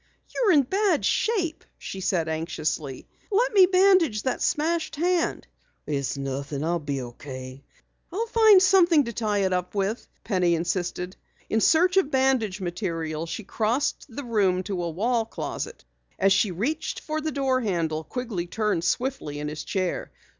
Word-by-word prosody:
"You're 440 -7 +3
in 290 -3 +5
bad 380 - +1
shape," 365 -8 0
she 190 - -7
said 175 -3 0
anxiously. 155 -3 -3 0.2
"Let 475 +4 +2
me 380 -3 +7
bandage 365 - +4
that 255 - -1
smashed 325 +2 0
hand." 345 +2 0 0.4
"It's 140 -2 -2
nothing. 140 +1 -4
I'll 170 +2 0
be 140 -3 -3
okay." 130 +2 -9 0.5
"I'll 425 +7 -1
find 440 -4 +6
something 360 -5 +5
to 235 -2 -5
tie 210 -2 0
it 185 - 0
up 180 +2 -2
with," 200 +4 -1 0.2
Penny 180 -5 +2
insisted. 180 +2 -3 0.3
In 220 - +2
search 360 - +4
of 380 -7 +3
bandage 260 -8 +1
material, 170 -3 -3
she 215 - -5
crossed 225 +7 -1
the 270 +4 -6
room 200 -6 +1
to 190 -2 -3
a 170 - -2
wall 225 +8 0
closet. 225 - -6 0.3
As 195 0 +4
she 205 - +2
reached 240 - -2
for 310 0 -3
the 315 0 -2
door 265 -2 +1
handle, 165 -7 -1
Quigley 220 -6 -4
turned 210 -3 -1
swiftly 240 - -1
in 150 0 -3
his 150 0 -6
chair. 185 -2 -2
210 Hz, 160 wpm, -25 LUFS, -, 0.5 s, me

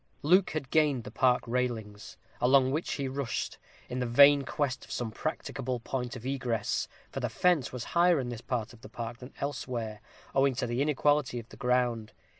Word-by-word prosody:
Luke 180 +6 +5
had 150 -4 -4
gained 150 -6 +3
the - - -8
park 125 -1 +3
palings, 115 -5 -3 0.2
along 130 +1 +5
which 155 +5 -1
he 140 -2 -2
rushed, 130 -2 -3 0.3
in 125 - -4
the 125 - -1
vain 140 +4 +7
quest 140 -1 -2
of - - -13
some 120 -3 -3
practicable 135 -2 -3
point 125 +1 -4
of 125 -1 -9
egress, 130 -4 -1 0.2
for - - -4
the - - -1
fence 175 -7 +2
was 125 -2 -5
higher 175 -2 +5
in 125 -2 -3
this 120 -2 -6
part 120 -3 -3
of 115 - -17
the - - -11
park 115 0 -6
than 125 - -10
elsewhere, 120 -6 -4 0.3
owing 135 -1 +3
to 120 - -1
the 120 +2 -1
inequality 145 -2 +2
of 115 -1 -7
the - - -12
ground. 125 -4 0
125 Hz, 195 wpm, -30 LUFS, 120-140 Hz, 0.3 s, vain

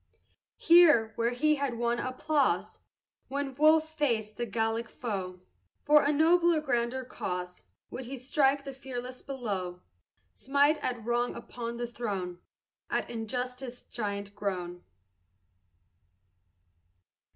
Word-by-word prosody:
Here, 305 -11 +6
where 230 0 +1
he 300 +5 +2
had 275 -3 -1
won 235 0 0
applause, 280 +3 0 0.5
When 280 0 -3
Wolfe 310 +3 +5
faced 225 -8 0
the 240 0 -3
Gallic 225 +2 -1
foe, 190 -6 -5 0.4
For 300 0 +6
a 290 - +3
nobler, 335 +2 +4
grander 250 -2 -1
cause 180 - -5 0.3
Would 255 - -6
he 270 +3 -6
strike 275 +2 +2
the 275 -1 -7
fearless 255 -1 -7
blow, 195 -10 -4 0.5
Smite 285 +3 +2
at 240 -3 -3
Wrong 240 +1 0
upon 235 0 -6
the 240 - -2
throne, 200 -7 -4 0.5
At - - -1
Injustice 250 +2 -4
giant 200 -3 -4
grown. 180 -4 -4
245 Hz, 115 wpm, -30 LUFS, 220-280 Hz, 0.5 s, Here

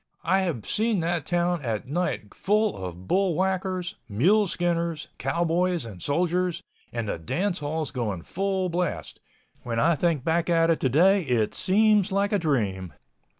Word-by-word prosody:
I 190 - +3
have 165 - -2
seen 220 -2 +1
that 170 -1 -1
town 175 -1 +1
at 115 -2 -3
night 145 - -2
full 210 +1 +1
of 90 -1 -7
bull 190 -3 +2
whackers, 185 -1 -1
mule 195 - +3
skinners, 170 -3 -1
cowboys 170 +2 0
and 100 -6 -10
soldiers, 175 +3 0 0.3
and 115 -2 -3
the 100 - -3
dance 180 - -1
halls 150 0 -3
going 105 -10 -3
full 190 - -1
blast—when 165 -8 -5
I 165 +7 +4
think 160 -3 0
back 165 +2 +1
at 165 -1 +4
it 165 - +1
today, 175 +10 +4
it 120 -8 0
seems 210 +1 +3
like 200 +1 +1
a 205 - +3
dream. 100 - -1
170 Hz, 150 wpm, -26 LUFS, 130-185 Hz, 0.3 s, I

